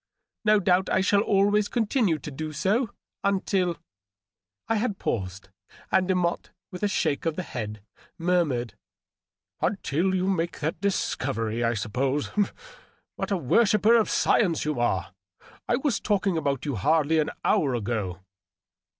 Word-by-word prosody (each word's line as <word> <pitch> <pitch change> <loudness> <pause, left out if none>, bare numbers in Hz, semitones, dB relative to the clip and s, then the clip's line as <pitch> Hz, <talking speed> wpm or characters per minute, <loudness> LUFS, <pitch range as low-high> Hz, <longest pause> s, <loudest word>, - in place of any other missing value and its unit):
" - - -56
No 215 -1 +5
doubt 185 -1 +2
I 190 - +2
shall 200 +1 +3
always 205 0 +3
continue 220 - +1
to 150 - -8
do 155 +3 -5
so, 210 - +1 0.3
until. 190 -3 +1 0.5
." 95 0 -64
I 225 - +1
had 210 -2 -1
paused, 95 - -3 0.4
and 185 - +3
Demotte, 180 -2 0 0.2
with 180 - -8
a 205 - +2
shake 160 -6 0
of 160 - 0
the 185 - -3
head, 105 - -6 0.4
murmured^ 165 - +1 0.9
"Until 190 -1 0
you 185 0 0
make 175 -3 -1
that 155 +2 -1
mighty - - -39
discovery, 120 - -1
I 115 0 +1
suppose. 130 +7 -1 0.8
What - - -3
a 200 - +1
wor 175 - +3
shipper 215 +2 +4
of 225 -2 +3
science 175 -9 +2
you 150 -4 -1
are! 95 -6 0 0.6
I 240 - +4
was 265 -4 0
talking 200 -3 0
about 140 -4 -1
you 140 -6 -2
hardly 155 - +2
an 150 - +1 0.2
hour 135 -4 +2
ago." 100 -5 -3
165 Hz, 155 wpm, -26 LUFS, 125-200 Hz, 0.9 s, No